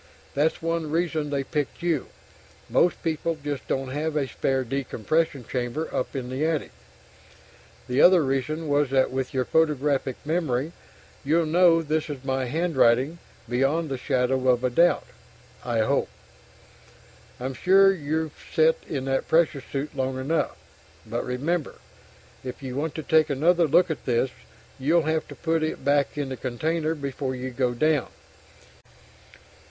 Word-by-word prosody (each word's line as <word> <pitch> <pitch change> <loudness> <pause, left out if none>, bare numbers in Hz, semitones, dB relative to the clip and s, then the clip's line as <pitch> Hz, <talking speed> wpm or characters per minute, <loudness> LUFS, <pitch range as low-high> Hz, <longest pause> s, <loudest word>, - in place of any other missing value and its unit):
That's 155 +3 0
one 165 -1 -1
reason 160 -2 -1
they 140 -1 -1
picked 150 +4 -3
you 165 -6 0 0.6
most 175 - +2
people 165 0 -1
just 145 -6 -4
don't 135 -1 -1
have 155 +3 -2
a 140 -3 0
spare 135 0 0
decompression 135 +2 -1
chamber 125 +6 -3
up 130 - -2
in 125 -2 -4
the 130 +3 -2
attic! 160 -2 -1 1.2
The 125 +2 +2
other 180 -3 +7
reason 135 +4 -1
was 145 -1 +2
that 130 -1 +2
with 130 0 -2
your 130 -1 0
photographic 145 -4 +1
memory, 155 -3 0 0.5
you'll 160 +4 +2
know 165 +1 +4
this 155 0 -1
is 140 -3 -6
my 130 -1 0
handwriting, 140 0 +2 0.3
beyond 135 +7 +1
the 135 - -2
shadow 130 +1 0
of 125 0 +3
a 125 - +1
doubt, 170 +7 +3 0.6
I 120 -2 0
hope. 110 - +1 1.3
I'm 130 +2 -3
sure 195 +8 +5
you've 155 -2 -2 0.2
sat 160 0 +4
in 135 -3 -3
that 135 0 -1
pressure 160 -4 +2
suit 140 +2 -5
long 130 0 -1
enough. 155 +5 -1 0.5
But 115 +2 -3
remember, 145 +6 -2 0.7
if 130 +2 -7
you 130 -1 -5
want 150 +2 -2
to 160 - -4
take 155 0 +3
another 165 +5 +3
look 170 +3 +4
at 155 - -5
this, 125 +1 +1 0.5
you'll 160 +5 +3
have 160 +1 -1
to - - -10
put 165 -1 0
it 155 - -3
back 145 +1 +2
in 145 -2 -2
the 130 - -5
container 155 +7 -1
before 135 -2 -4
you 130 +1 -5
go 125 -1 0
"down." 155 +1 +2
145 Hz, 155 wpm, -25 LUFS, 130-160 Hz, 1.3 s, other